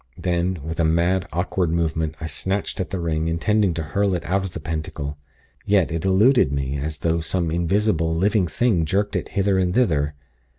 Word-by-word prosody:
Then, 90 Hz, 0 st, 0 dB
with 80 Hz, +1 st, -5 dB
a -, -, +3 dB
mad, 85 Hz, +3 st, +2 dB
awkward 90 Hz, 0 st, 0 dB
movement, 80 Hz, -1 st, -1 dB
I -, -, -5 dB
snatched 95 Hz, +6 st, -3 dB
at 95 Hz, -, -2 dB
the 95 Hz, -, -3 dB
ring, 80 Hz, -1 st, -1 dB
intending 90 Hz, +3 st, +1 dB
to 80 Hz, -, -2 dB
hurl 95 Hz, +5 st, 0 dB
it 85 Hz, -, -4 dB
out 95 Hz, +4 st, 0 dB
of 95 Hz, -2 st, -6 dB
the -, -, -5 dB
Pentacle. 75 Hz, -2 st, -4 dB, 0.5 s
Yet 100 Hz, -5 st, +2 dB
it 80 Hz, -1 st, -2 dB
eluded 95 Hz, -, +4 dB
me, 70 Hz, 0 st, -2 dB
as 75 Hz, +2 st, -4 dB
though 85 Hz, +1 st, 0 dB
some 85 Hz, 0 st, -1 dB
invisible, 85 Hz, -1 st, +1 dB
living 95 Hz, +2 st, +2 dB
thing 95 Hz, 0 st, +1 dB
jerked 100 Hz, +6 st, 0 dB
it -, -, -2 dB
hither 100 Hz, -1 st, +1 dB
and 90 Hz, 0 st, 0 dB
thither. 75 Hz, -, +2 dB
85 Hz, 195 wpm, -22 LUFS, 80-95 Hz, 0.5 s, eluded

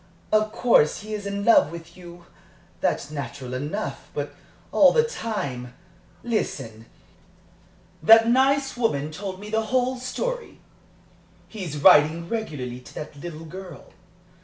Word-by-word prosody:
_ -, -, +6 dB
Of 215 Hz, 0 st, +2 dB
course 220 Hz, -11 st, +3 dB
he 215 Hz, +1 st, -7 dB
is 205 Hz, -1 st, -4 dB
in 200 Hz, 0 st, -3 dB
love 230 Hz, -9 st, +5 dB
with 170 Hz, -1 st, -10 dB
you. 175 Hz, -1 st, -13 dB, 0.5 s
That's 145 Hz, -, -1 dB
natural 135 Hz, -3 st, -6 dB
enough. 150 Hz, +11 st, -4 dB
But -, -, -3 dB, 0.4 s
all -, -, +6 dB
the 465 Hz, -, +4 dB
time 145 Hz, -, -4 dB, 0.5 s
listen, 115 Hz, -, -3 dB, 1.1 s
that 225 Hz, +7 st, +7 dB
nice 270 Hz, +2 st, +3 dB
woman 155 Hz, -, 0 dB
told 190 Hz, +3 st, -6 dB
me 210 Hz, +1 st, -9 dB
the 220 Hz, 0 st, 0 dB
whole 255 Hz, +2 st, 0 dB
story -, -, -4 dB, 0.9 s
he's 180 Hz, -9 st, -6 dB
writing 155 Hz, +4 st, +5 dB
regularly 150 Hz, -, -4 dB
to 125 Hz, -, -15 dB
that 150 Hz, 0 st, -7 dB
little 160 Hz, +1 st, -8 dB
girl. 180 Hz, -1 st, -10 dB
185 Hz, 135 wpm, -24 LUFS, 150-225 Hz, 1.1 s, that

